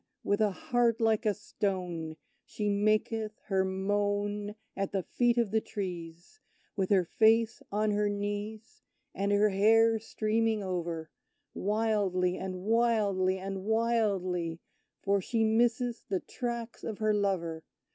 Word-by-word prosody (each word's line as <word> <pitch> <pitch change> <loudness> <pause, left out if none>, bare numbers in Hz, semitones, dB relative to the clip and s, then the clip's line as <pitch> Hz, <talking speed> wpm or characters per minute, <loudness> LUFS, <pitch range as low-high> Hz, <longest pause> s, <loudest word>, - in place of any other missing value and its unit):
With 205 +2 +1
a 215 - +4
heart 235 +3 +1
like 225 -1 +2
a 210 - +3
stone, 180 -6 -3 0.3
She 210 -1 -3
maketh 215 +1 +1
her 190 -2 +1
moan 205 +2 -1 0.2
At 195 0 -2
the 190 -2 0
feet 240 +4 +1
of 235 -4 +1
the 220 0 +2
trees, 175 - -6 0.4
With 190 -2 0
her 190 -3 +4
face 225 +4 +3
on 210 +1 +1
her 205 0 +1
knees, 205 +2 -4 0.3
And 200 +1 -1
her 205 +1 +4
hair 225 +3 +4
streaming 220 0 0
over; 170 -4 -3 0.4
Wildly, 200 -4 +1
and 185 -1 -5
wildly, 210 -4 +2
and 190 0 -5
wildly; 200 -7 0 0.4
For 200 0 +2
she 225 +4 0
misses 235 +2 +2
the 190 - +1
tracks 235 +1 -5
of 220 -3 -4
her 215 -1 +1
lover! 175 -6 -1
205 Hz, 135 wpm, -30 LUFS, 190-220 Hz, 0.4 s, a